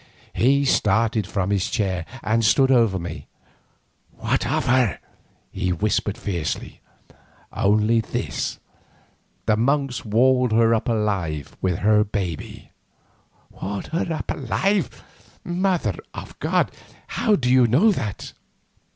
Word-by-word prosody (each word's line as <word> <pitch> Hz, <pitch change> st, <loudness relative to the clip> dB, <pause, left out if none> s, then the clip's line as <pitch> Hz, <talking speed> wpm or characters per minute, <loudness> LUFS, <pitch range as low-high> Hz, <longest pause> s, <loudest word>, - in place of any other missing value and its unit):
He 140 Hz, +4 st, +3 dB
started 110 Hz, -3 st, +2 dB
from 100 Hz, -1 st, -2 dB
his 100 Hz, -2 st, 0 dB
chair 95 Hz, -5 st, -1 dB, 0.2 s
and 110 Hz, +3 st, +1 dB
stood 130 Hz, +5 st, +4 dB
over 115 Hz, -7 st, +3 dB
me. 85 Hz, -1 st, -7 dB, 0.9 s
"What -, -, -1 dB
of -, -, 0 dB
her?" 125 Hz, -4 st, +2 dB, 0.5 s
he 90 Hz, 0 st, -2 dB
whispered 105 Hz, +3 st, 0 dB
fiercely. 90 Hz, -9 st, -4 dB, 0.7 s
"Only 105 Hz, +3 st, +2 dB
this, -, -, -3 dB, 0.9 s
the 110 Hz, -, +3 dB
monks 135 Hz, +2 st, 0 dB
walled 125 Hz, +2 st, +3 dB
her 115 Hz, 0 st, +4 dB
up 115 Hz, +1 st, 0 dB
alive 95 Hz, -, -2 dB
with 90 Hz, -3 st, 0 dB
her 105 Hz, 0 st, +5 dB
babe." 95 Hz, -7 st, -5 dB, 0.9 s
"Walled 100 Hz, 0 st, -5 dB
her 165 Hz, +1 st, -2 dB
up 155 Hz, -3 st, -3 dB
alive! 190 Hz, -, -1 dB, 0.4 s
Mother 180 Hz, 0 st, 0 dB, 0.2 s
of -, -, -9 dB
God! -, -, +1 dB, 0.3 s
how 220 Hz, -3 st, +1 dB
do 130 Hz, -9 st, -2 dB
you 130 Hz, -2 st, +5 dB
know 160 Hz, -, +4 dB
that?" 105 Hz, -, -4 dB
110 Hz, 120 wpm, -23 LUFS, 100-130 Hz, 0.9 s, her